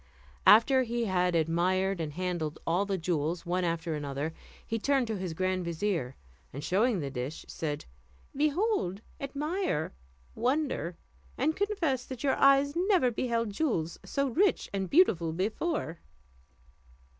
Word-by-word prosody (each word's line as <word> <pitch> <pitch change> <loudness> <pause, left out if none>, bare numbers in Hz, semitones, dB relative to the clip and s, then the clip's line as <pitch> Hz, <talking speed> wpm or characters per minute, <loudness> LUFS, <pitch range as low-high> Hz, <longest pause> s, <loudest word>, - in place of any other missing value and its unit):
After 260 +5 +7
he 235 -1 -1
had 180 -3 +1
admired 180 +3 +1
and 150 -2 -4
handled 175 -3 -2
all 180 +5 +1
the 195 -1 0
jewels 165 -1 -1
one 180 +1 0
after 165 -1 -1
another, 145 +1 -3 0.3
he 225 - -2
turned 270 +2 +2
to 220 -1 -3
his 185 -4 -4
grand 185 +1 0
vizier, 170 -6 -2 0.4
and 140 +3 -7
showing 210 +9 +2
him - - -1
the 140 -1 -4
dish, 130 +3 -5
said, 150 -2 -4 0.5
"Behold, 300 - +1 0.2
admire, 295 - -2 0.4
wonder! 250 - -1 0.4
and 310 +5 +1
confess 370 - 0
that 260 -1 -7
your 275 - +3
eyes 275 +1 +5
never 355 - +3
beheld 230 -2 -1
jewels 200 - -1
so 275 0 -1
rich 380 - +1
and 190 -2 -2
beautiful 175 - +4
before." 195 - -2
195 Hz, 140 wpm, -30 LUFS, 165-275 Hz, 0.5 s, After